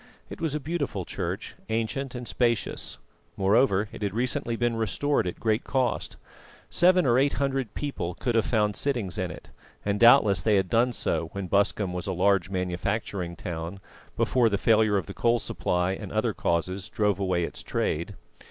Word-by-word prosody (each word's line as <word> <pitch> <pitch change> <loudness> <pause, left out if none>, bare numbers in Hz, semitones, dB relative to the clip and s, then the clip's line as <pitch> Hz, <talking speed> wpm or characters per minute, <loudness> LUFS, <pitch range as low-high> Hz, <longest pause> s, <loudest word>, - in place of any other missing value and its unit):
It - - -8
was 160 -3 -1
a - - -1
beautiful 140 - -3
church, - - -4 0.2
ancient 115 +4 -2
and 120 -1 -6
spacious; 120 -4 -1 0.4
moreover, 100 +1 +3
it - - -10
had 100 -1 -2
recently 120 -1 -1
been 120 0 0
restored 115 +3 0
at 90 - -5
great 110 +1 +1
cost. 130 -3 -1 0.5
Seven 180 -1 +4
or 120 -1 +4
eight 140 +1 +2
hundred 135 -5 -1
people 90 -12 -3
could 120 - -1
have 115 -2 +2
found 105 -4 +1
sittings 120 -11 -1
in - - -1
it, - - -11 0.3
and 100 0 0
doubtless 115 -7 +6
they 105 +4 +3
had 95 -2 +1
done 120 +2 +3
so 85 -7 -1
when 100 -1 -4
Busscombe 100 0 +1
was 90 +1 -4
a 95 - -1
large 95 0 +2
manufacturing 90 0 -2
town, 85 +2 -5 0.4
before 120 -3 +3
the 100 - 0
failure 110 -1 +3
of 95 - -2
the - - -8
coal 120 0 +2
supply 90 -5 -1
and 95 - -6
other - - 0
causes 90 +4 -1
drove 105 -3 +1
away 90 -3 +1
its - - -5
trade. - - -2
105 Hz, 180 wpm, -27 LUFS, 95-120 Hz, 0.5 s, doubtless